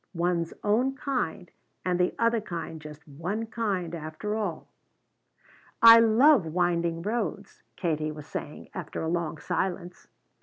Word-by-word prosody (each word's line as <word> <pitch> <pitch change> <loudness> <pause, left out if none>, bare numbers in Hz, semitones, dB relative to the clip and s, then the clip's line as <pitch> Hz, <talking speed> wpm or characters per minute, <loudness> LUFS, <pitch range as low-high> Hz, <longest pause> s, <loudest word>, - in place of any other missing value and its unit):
One's 170 -1 0
own 245 +6 +2
kind 240 - -3 0.3
and 180 -1 +1
the 180 - +1
other 230 -1 +2
kind 165 -4 -6
just 150 0 -11
one 175 +10 -4
kind, 200 -7 -2
after 160 +6 -4
all? 205 -7 -3 1.1
"I 230 0 +10
love 230 - +5
winding 170 0 0
roads," 210 -2 -3
Katie 155 -3 -1
was 150 -1 -9
saying, 150 0 -7
after 175 -4 -5
a - - -2
long 165 -1 -2
silence. 180 +1 -3
180 Hz, 130 wpm, -27 LUFS, 165-215 Hz, 1.1 s, I